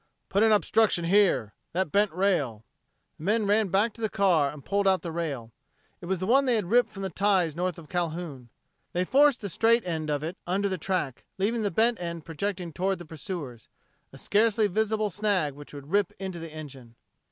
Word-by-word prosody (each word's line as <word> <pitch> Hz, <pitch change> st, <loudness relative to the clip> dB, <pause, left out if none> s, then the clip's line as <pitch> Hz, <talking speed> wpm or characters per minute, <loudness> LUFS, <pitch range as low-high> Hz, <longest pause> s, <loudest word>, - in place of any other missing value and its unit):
"Put 200 Hz, -, +2 dB
an 220 Hz, 0 st, +5 dB
obstruction 210 Hz, -4 st, +3 dB
here! 175 Hz, -, +3 dB, 0.2 s
That 180 Hz, -3 st, -1 dB
bent 205 Hz, 0 st, +3 dB
rail!" 150 Hz, -, 0 dB, 0.5 s
The -, -, -10 dB
men 210 Hz, +4 st, +1 dB
ran 210 Hz, +1 st, +3 dB
back 205 Hz, +4 st, +1 dB
to 230 Hz, -, -12 dB
the 220 Hz, -, 0 dB
car 175 Hz, -9 st, +3 dB
and 145 Hz, -1 st, -12 dB
pulled 200 Hz, 0 st, +1 dB
out 190 Hz, -1 st, +3 dB
the 170 Hz, -, -4 dB
rail. 145 Hz, -9 st, -4 dB, 0.5 s
It -, -, -8 dB
was 190 Hz, +1 st, 0 dB
the 185 Hz, -, -3 dB
one 270 Hz, +6 st, +4 dB
they 250 Hz, -2 st, +3 dB
had 205 Hz, -4 st, -2 dB
ripped 245 Hz, +1 st, +4 dB
from 195 Hz, -, -8 dB
the 190 Hz, -, -3 dB
ties 185 Hz, -4 st, +2 dB
north 180 Hz, 0 st, -2 dB
of 165 Hz, -2 st, -11 dB
Calhoun. 165 Hz, -7 st, -4 dB, 0.4 s
They 180 Hz, 0 st, 0 dB
forced 280 Hz, +3 st, +4 dB
the 205 Hz, -, -3 dB
straight 230 Hz, +5 st, +3 dB
end 160 Hz, -3 st, -3 dB
of 145 Hz, 0 st, -1 dB
it 170 Hz, +4 st, -4 dB
under 195 Hz, +3 st, +1 dB
the 185 Hz, -2 st, -3 dB
track, 160 Hz, -8 st, -2 dB
leaving 220 Hz, +4 st, 0 dB
the 205 Hz, -, 0 dB
bent 225 Hz, +3 st, +2 dB
end 170 Hz, -2 st, -5 dB
projecting 175 Hz, +1 st, -4 dB
toward 190 Hz, +3 st, 0 dB
the 175 Hz, -, -10 dB
pursuers 150 Hz, -6 st, -7 dB, 0.4 s
a 135 Hz, -, -12 dB
scarcely 215 Hz, -, +2 dB
visible 215 Hz, +1 st, 0 dB
snag 195 Hz, -7 st, 0 dB
which 145 Hz, +1 st, -12 dB
would 145 Hz, +1 st, -10 dB
rip 200 Hz, -2 st, +2 dB
into 190 Hz, -3 st, -5 dB
the 165 Hz, -1 st, -8 dB
engine. 135 Hz, -6 st, -10 dB
185 Hz, 210 wpm, -27 LUFS, 160-205 Hz, 0.5 s, an